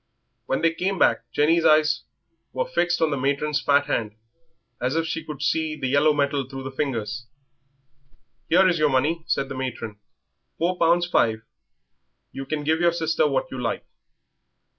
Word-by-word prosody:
When - - -1
they 165 0 +3
came 190 +3 -2
back - - +2
Jenny's 165 +3 +3
eyes 155 0 +3 0.5
were - - -1
fixed 175 - 0
on 160 - +2
the 140 - -1
matron's 145 +2 0
fat 145 0 +3
hand 105 -2 -2 0.7
as 130 +4 0
if 165 0 +1
she 165 0 -3
could 150 -1 -7
see 155 +1 0
the 140 - -5
yellow 145 +3 +4
metal 140 -2 0
through 135 -1 -7
the 135 - -6
fingers. 125 -3 -3 1.2
"Here 185 +3 +5
is 175 -3 +1
your 155 -1 +3
money," 150 +5 +1
said 140 -5 0
the 135 - -6
matron; 120 -5 -5 0.6
"four 180 +2 -1
pounds 170 +1 +3
five. 110 -10 +1 0.9
You 135 0 -7
can 155 -1 -3
give 160 +2 +1
your 170 -1 +3
sister 160 -2 +1
what 135 -2 -1
you 130 - -5
like." 115 - -3
150 Hz, 170 wpm, -24 LUFS, 135-165 Hz, 1.2 s, Here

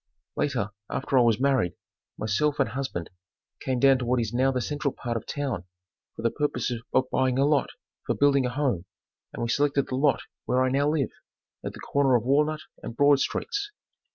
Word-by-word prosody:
Later, 120 -8 -1 0.2
after 135 - -2
I 130 - +7
was 115 -3 +3
married, 130 -9 +2 0.4
myself 125 +9 0
and 140 - +2
husband 130 -11 -4 0.5
came 130 -1 -1
down 135 0 +5
to 125 - -3
what 125 +1 +2
is 115 -2 -2
now 130 +2 +3
the 130 - -1
central 145 +2 -2
part 120 -1 -4
of 115 - -4
town 135 -11 -3 0.5
for - - -8
the 115 - +2
purpose 145 -3 -1 0.2
of 130 0 +2
buying 130 -1 +1
a 135 - +4
lot 145 -2 +2 0.4
for - - +1
building 140 -2 +3
a - - -2
home, 125 - -1 0.5
and - - -4
we 115 - -2
selected 140 +2 +1
the 130 - -2
lot 135 -1 +2 0.2
where 130 +1 +2
I 130 - +2
now 140 +3 +2
live, 150 -5 0 0.5
at - - -4
the - - -11
corner 140 -2 +2
of 120 - +2
Walnut 150 +4 +2 0.2
and 115 - -7
Broad 145 -1 +5
streets. 410 - -2
135 Hz, 200 wpm, -26 LUFS, 120-145 Hz, 0.5 s, I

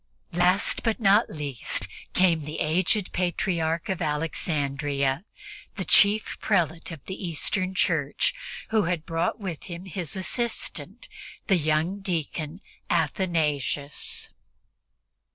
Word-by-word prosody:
Last 180 +3 +4
but 225 0 0
not 205 0 +4
least 145 -6 -2 0.3
came 175 -3 +3
the 150 +1 -5
aged 180 +5 +2
Patriarch 170 -1 0
of 190 -4 -2
Alexandria, 145 -2 -1 0.5
the 190 -3 -3
chief 205 +2 +5
prelate 170 -5 0
of 160 -6 -9
the 190 +1 -6
Eastern 185 +3 -1
Church, 155 -6 +2 0.4
who 220 -4 +2
had 165 -2 -1
brought 165 +6 -1
with 185 -7 -5
him 175 0 -7
as 185 - -10
his 175 -3 -3
assistant 235 - -2 0.4
the 195 - +3
young 160 +5 0
deacon 170 -2 -3 0.3
Athanasius. 150 -4 0
170 Hz, 115 wpm, -26 LUFS, 155-190 Hz, 0.5 s, chief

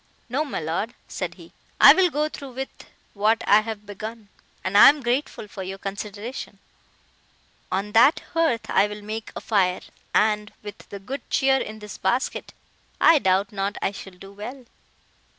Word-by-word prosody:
"No, 275 +6 0
my 290 - -4
Lord," 165 +9 -3
said - - -5
he, - - -15 0.3
"I - - +10
will 375 -1 +3
go 300 0 0
through 275 -4 -9
with 265 +2 -8 0.2
what 215 +2 +1
I 210 +1 +6
have 215 -1 -7
begun; 215 +1 -8 0.3
and 185 +1 -3
I 205 - +10
am 290 -1 0
grateful 245 -2 -2
for 205 - -8
your 190 +1 -5
consideration. 205 +5 -6 1.1
On 195 +2 -2
that 230 +7 +5
hearth 320 -9 +1
I 195 +2 +3
will 210 0 -8
make 220 +1 -6
a - - -5
fire, 185 -4 +1 0.3
and, 210 0 +2
with 205 -1 -8
the 200 - -7
good 250 +8 -6
cheer 270 0 +3
in 220 -4 -5
this 210 -2 -10
basket, 240 +7 -1 0.5
I 325 - +6
doubt 190 -2 +1
not 200 0 -3
I - - -1
shall 195 -1 -10
do 195 +2 -13
well." 245 +6 -8
210 Hz, 170 wpm, -24 LUFS, 200-250 Hz, 1.1 s, I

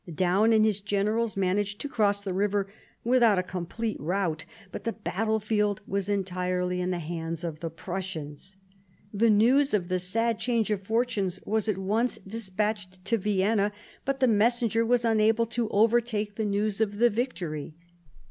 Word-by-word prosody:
Daun 185 +7 +2
and 220 -1 +5
his 210 -2 +2
generals 205 +2 0
managed 200 +2 0
to - - -4
cross 205 -6 +1
the 195 -2 -3
river 200 +1 0 0.4
without 235 -4 +4
a 185 - +1
complete 185 +5 -4
rout, 165 -1 -1 0.3
but - - -7
the 230 - -2
battlefield 210 +1 -1
was 200 0 -2
entirely 180 -2 -1
in 180 - -1
the 180 - -1
hands 165 0 -4
of 160 -3 -4
the 165 - -4
Prussians. 175 -1 -6 0.6
The 225 +3 +3
news 245 +6 +4
of 180 -3 -2
the 185 0 +1
sad 225 +5 0
change 230 -3 0
of 205 -2 0
fortune 225 -4 +1 0.2
was 220 0 0
at 205 - 0
once 215 +6 0
despatched 200 -2 -3
to 230 -1 +1
Vienna, 205 +1 +1 0.3
but 275 0 -1
the 260 - +4
messenger 230 +1 +2
was 240 +1 +2
unable 225 +1 +3
to 230 -1 -2
overtake 220 -1 +2
the 220 +1 -2
news 205 +1 0
of 205 -2 0
the 240 +2 +4
victory. 175 - -3
205 Hz, 165 wpm, -27 LUFS, 185-225 Hz, 0.6 s, and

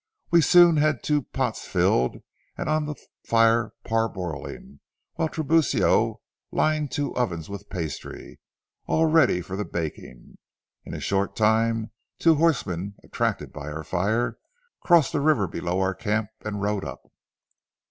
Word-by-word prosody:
We 170 -1 +6
soon 175 0 +6
had 150 -3 +1
two 150 -1 +1
pots - - -3
filled 65 +1 +1 0.3
and - - -4
on 155 0 +1
the 150 - -4 0.3
fire 115 0 +3
parboiling, 95 -10 -3 0.3
while 160 - -1
Tiburcio 160 -2 +2 0.3
lined 155 -2 +1
two 145 -2 -2
ovens 85 -10 -2
with 100 0 -8
pastry, 80 -7 -6 0.5
all 160 - +3
ready 155 - +4
for 90 +2 -6
the 105 - -2
baking. 80 -9 -7 0.5
In - - -7
a - - -5
short 100 0 -1
time 110 0 +2 0.3
two 165 - +5
horsemen, 105 - 0
attracted - - -2
by 75 -1 -7
our 80 +1 -5
fire, 100 +9 -1 0.4
crossed 170 -5 +4
the 145 - 0
river 140 -10 +3
below 85 +2 -2
our 95 0 +1
camp 105 +1 -1
and 105 -2 -4
rode 105 -1 -1
up. - - -7
110 Hz, 140 wpm, -25 LUFS, 95-150 Hz, 0.5 s, We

